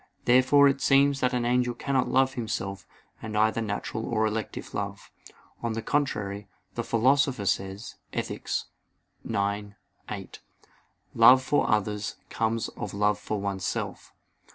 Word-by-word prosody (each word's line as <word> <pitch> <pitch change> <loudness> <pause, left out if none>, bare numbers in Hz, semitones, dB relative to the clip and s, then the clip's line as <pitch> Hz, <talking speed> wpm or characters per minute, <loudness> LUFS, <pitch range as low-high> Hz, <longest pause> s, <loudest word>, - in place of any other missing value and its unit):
Therefore 130 +3 +6
it 135 0 +1
seems 140 0 +4
that 125 -1 +2
an 125 -2 -1
angel 125 0 +1
cannot 130 +1 0
love 130 0 +2
himself 100 -5 -4 0.3
with 110 -1 -6
either 110 +2 +2
natural 110 +1 -3
or 110 -2 +1
elective 110 -1 -4
love. 100 0 -5 0.5
On 115 -1 -2
the 115 0 -4
contrary, 105 -8 -1 0.3
The - - -3
Philosopher 130 -1 +2
says 95 +2 -2
(Ethic. - - -4
ix, - - 0 1.4
8): - - -7 0.7
"Love 130 +1 +7
for 145 +3 +1
others 105 -1 0 0.2
comes 115 0 0
of 100 -1 -7
love 105 0 +2
for 105 0 -3
oneself." 100 -1 -3
115 Hz, 130 wpm, -27 LUFS, 105-130 Hz, 1.4 s, Love